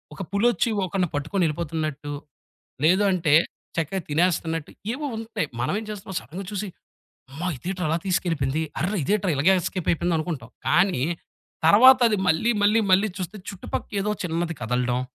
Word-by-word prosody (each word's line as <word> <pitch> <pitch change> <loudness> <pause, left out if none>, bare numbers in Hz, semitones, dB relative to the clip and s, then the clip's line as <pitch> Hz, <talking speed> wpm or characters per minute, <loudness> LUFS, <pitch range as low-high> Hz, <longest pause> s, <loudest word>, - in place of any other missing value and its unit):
ఒక - - -7
పులొచ్చి 230 +2 +2 0.2
ఒకడిని 185 0 0
పట్టుకొనెళ్ళిపోతున్నట్టు 155 -2 -2 0.7
లేదు 185 +5 +4
అంటే 165 -5 +2 0.4
చక్కగా 165 +4 -1
తినేస్తున్నట్టు 165 0 0 0.2
ఏవో 295 +3 -4
ఉంటాయి. 225 -8 -3
మనమేం 205 - -1
చేస్తాం 195 -2 -7
సడెన్‌గా 160 - -8
చూసి 205 0 -3 0.6
అమ్మ! 140 +5 -8
ఇదేంట్రా 180 +7 -4
అలా 165 +2 +1
తీసుకెళ్ళిపోయింది. 160 -5 0 0.2
అర్రే! 185 +7 0
ఇదేంట్రా 200 +3 +1
ఇలాగేస్కేపయిపోయిందనుకుంటాం. 165 -3 0 0.2
కానీ 180 -8 +3 0.6
తర్వాత 255 +9 +8
అది 215 - +1
మళ్ళీ 180 +9 +3
మళ్ళీ 210 +2 +4
మళ్ళీ 200 +3 +4
చూస్తే 185 +2 -5
చుట్టుపక్కేదో 200 +1 -3
చిన్నది 165 -1 -2
కదలడం. 125 +1 0
175 Hz, 125 wpm, -24 LUFS, 155-200 Hz, 0.7 s, తర్వాత